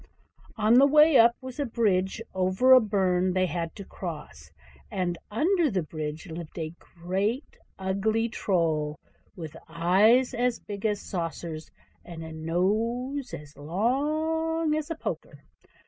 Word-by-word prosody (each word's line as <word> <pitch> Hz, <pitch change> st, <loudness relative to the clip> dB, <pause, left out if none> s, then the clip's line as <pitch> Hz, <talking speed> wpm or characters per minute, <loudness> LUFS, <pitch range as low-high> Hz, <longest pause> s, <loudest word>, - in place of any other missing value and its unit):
On 220 Hz, +3 st, +5 dB
the 280 Hz, -, +7 dB
way 300 Hz, 0 st, +6 dB
up 235 Hz, +1 st, +6 dB
was 260 Hz, +1 st, -8 dB
a 285 Hz, -, +1 dB
bridge 210 Hz, -3 st, 0 dB
over 190 Hz, +8 st, +4 dB
a 255 Hz, -, +10 dB
burn 185 Hz, -4 st, +1 dB
they 185 Hz, 0 st, +2 dB
had 170 Hz, -1 st, -3 dB
to 200 Hz, -, -8 dB
cross; 150 Hz, -, -8 dB, 0.4 s
and 180 Hz, -2 st, -1 dB
under 330 Hz, -, +2 dB
the 190 Hz, -6 st, -1 dB
bridge 155 Hz, +1 st, -5 dB
lived 170 Hz, -1 st, -8 dB
a 160 Hz, -1 st, -4 dB
great 195 Hz, -, -3 dB, 0.2 s
ugly 200 Hz, +4 st, 0 dB
Troll, 160 Hz, -9 st, 0 dB, 0.4 s
with 160 Hz, -3 st, -8 dB
eyes 195 Hz, +10 st, +4 dB
as 245 Hz, 0 st, 0 dB
big 205 Hz, +1 st, -4 dB
as 205 Hz, -1 st, -1 dB
saucers, 165 Hz, -3 st, -5 dB, 0.3 s
and 165 Hz, -2 st, -9 dB
a 160 Hz, -, -8 dB
nose 225 Hz, -, -1 dB
as 145 Hz, 0 st, -9 dB
long 305 Hz, -, 0 dB
as 310 Hz, 0 st, -2 dB
a 330 Hz, -, -2 dB
poker. -, -, -6 dB
195 Hz, 140 wpm, -27 LUFS, 170-250 Hz, 0.4 s, a